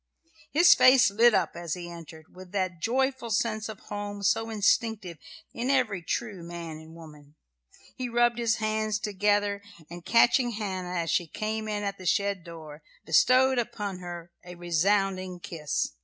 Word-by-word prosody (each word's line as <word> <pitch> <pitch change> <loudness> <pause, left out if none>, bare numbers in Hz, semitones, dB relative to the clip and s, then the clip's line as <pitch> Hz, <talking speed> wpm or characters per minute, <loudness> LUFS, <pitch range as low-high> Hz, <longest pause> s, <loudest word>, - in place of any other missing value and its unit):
His 345 +4 +7
face 255 -4 +6
lit 230 +3 +5
up, 180 -4 0
as 170 -3 -4
he 175 -1 -7
entered, 160 -2 -12
with 185 -1 -12
that 185 -4 -2
joyful 260 +1 0
sense 220 -1 -1
of 215 - -9
home 205 -1 -6
so 225 +3 +1
instinctive 210 -4 0 0.3
in 240 +3 -3
every 250 -9 +1
true 200 +2 -4
man 170 -2 -7
and 160 +1 -13
woman. 150 -3 -14 0.6
He 255 -1 -4
rubbed 240 0 +2
his 230 -1 +1
hard 220 -2 -2
hands 215 -1 -1
together, 205 0 0 0.3
and 175 0 -9
catching 235 +4 +3
Hannah 185 -4 -4
as 165 -1 -1
she 175 - +1
came 215 +5 -4
in 210 -1 -3
at 200 -1 -4
the 185 - -6
shed 200 -3 0
door, 160 -3 -11 0.2
bestowed 255 - +4
upon 205 -5 -4
her 175 -1 -8
a 180 0 -10
resounding 185 +2 0
kiss. 170 -7 -3
200 Hz, 165 wpm, -27 LUFS, 175-225 Hz, 0.6 s, His